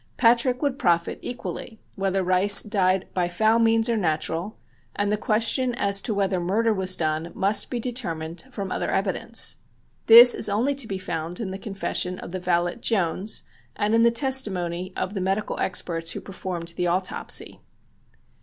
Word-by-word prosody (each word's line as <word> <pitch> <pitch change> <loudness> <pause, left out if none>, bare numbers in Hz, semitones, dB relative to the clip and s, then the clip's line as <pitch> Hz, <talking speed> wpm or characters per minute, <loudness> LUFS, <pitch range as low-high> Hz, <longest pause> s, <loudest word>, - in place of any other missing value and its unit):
Patrick 245 +2 +2
would 280 -2 -1
profit 170 -1 0
equally 240 -2 -7
whether 195 -1 -1
Rice 185 +3 +7
died 190 -3 0
by 175 -1 -1
foul 220 +6 +2
means 225 0 +3
or 235 - 0
natural, 170 +1 -2 0.4
and 205 0 -1
the - - +2
question 230 +4 0
as 200 -3 0
to 220 - -3
whether 195 -2 0
murder 215 +6 0
was 185 -2 +1
done 160 +1 -2
must 200 +2 +2
be 245 - -3
determined 175 -10 -5
from 200 -7 -6
other - - -2
evidence. - - -1 0.5
This 240 +2 +10
is 210 - +2
only 230 +8 0
to 275 -4 0
be 195 - -4
found 175 -2 -5
in 205 -5 -4
the 190 - -6
confession 190 -3 -3
of 170 - -9
the 185 - -4
valet 175 -1 -1
Jones 200 -3 -1 0.3
and 210 +1 -1
in 230 - +4
the 235 - +5
testimony 195 -9 -1
of 190 - -3
the 195 - -4
medical 195 +3 -2
experts 165 -3 -2
who - - -5
performed 180 -3 -6
the 175 - 0
autopsy. 185 +2 -2
195 Hz, 170 wpm, -24 LUFS, 180-225 Hz, 0.5 s, This